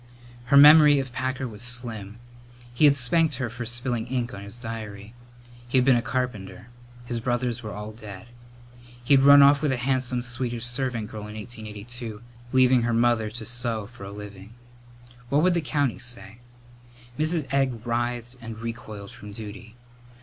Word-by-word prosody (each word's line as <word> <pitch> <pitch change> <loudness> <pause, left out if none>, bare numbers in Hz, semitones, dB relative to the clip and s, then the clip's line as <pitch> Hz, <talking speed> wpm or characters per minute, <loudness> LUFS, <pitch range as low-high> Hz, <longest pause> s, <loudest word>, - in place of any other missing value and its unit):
Her 140 +2 +4
memory 150 0 +9
of 135 -2 -3
Packer 130 +2 -2
was 105 -2 -10
slim. 115 -4 -3 0.6
He 135 +5 +4
had 140 -1 +6
spanked 150 +4 +2
her 125 -2 -3
for 120 0 -6
spilling 120 -1 -2
ink 125 -1 -2
on 100 - -7
his 100 +3 -8
diary. 110 -3 -7 0.5
He 130 - +1
had 125 - +4
been 130 -2 +6
a 120 - +2
carpenter. 125 -3 -4 0.4
His 120 -1 -3
brothers 120 0 -1
were 110 -2 -6
all 105 +1 -6
dead. 105 -4 -10 0.8
He 125 - +3
had 135 -1 +6
run 140 0 +9
off 140 0 +6
with 150 - +1
a 130 - 0
handsome 125 -1 -1
Swedish 120 -1 -3
servant 120 -3 -3
girl 105 -1 -7
in 105 - -9
1882, 110 +1 -8 0.3
leaving 130 -1 +4
her 120 0 0
mother 115 -2 +2
to 110 +1 -7
sew 115 -3 -2
for 115 -1 -13
a 100 - -7
living. 105 +1 -10 0.7
What 145 +2 +3
would 180 0 +4
the 170 - +1
county 145 -4 -1
say? 120 -3 -6 0.8
Mrs. 155 -1 +1
Egg 130 -5 0
writhed 120 +1 -2
and 115 -1 -7
recoiled 115 -3 -7
from 105 -4 -11
duty. 110 +1 -9
120 Hz, 170 wpm, -25 LUFS, 110-130 Hz, 0.8 s, memory